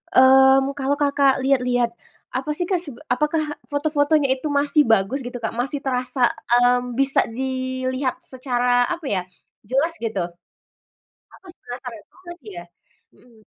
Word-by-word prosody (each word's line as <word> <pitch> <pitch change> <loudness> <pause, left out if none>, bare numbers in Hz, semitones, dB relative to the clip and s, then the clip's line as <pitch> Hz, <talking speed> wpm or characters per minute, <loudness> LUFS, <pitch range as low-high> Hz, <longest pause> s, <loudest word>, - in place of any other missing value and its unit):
mmm, 265 +1 +6
kalau 275 +2 0
Kakak 280 -2 +2
lihat-lihat, 250 -3 +1 0.4
apa 265 +4 -4
sih, 355 - -1
Kak, 360 0 0
se 290 -8 -4 0.2
apakah 300 +4 +1 0.2
foto-fotonya 290 -1 +1
itu 305 - -4
masih 290 -1 +2
bagus 225 +5 +2
gitu, 245 - -6
Kak? 225 - -1
Masih 265 +4 -3
terasa, 255 -1 +1 0.2
mmm, 245 0 +2
bisa 275 +1 +3
dilihat 260 +1 -3
secara 245 -1 0
apa 345 -2 -4
ya, 185 - 0 0.5
jelas 280 +7 +1
gitu? 215 -6 -2 1.1
Aku 385 - -22 0.2
penasaran 245 -2 -7
juga 360 -1 -14
sih 215 -5 -12
ya. 175 - -7 0.5
Mhm. 230 -3 -23
260 Hz, 135 wpm, -22 LUFS, 245-285 Hz, 1.1 s, mmm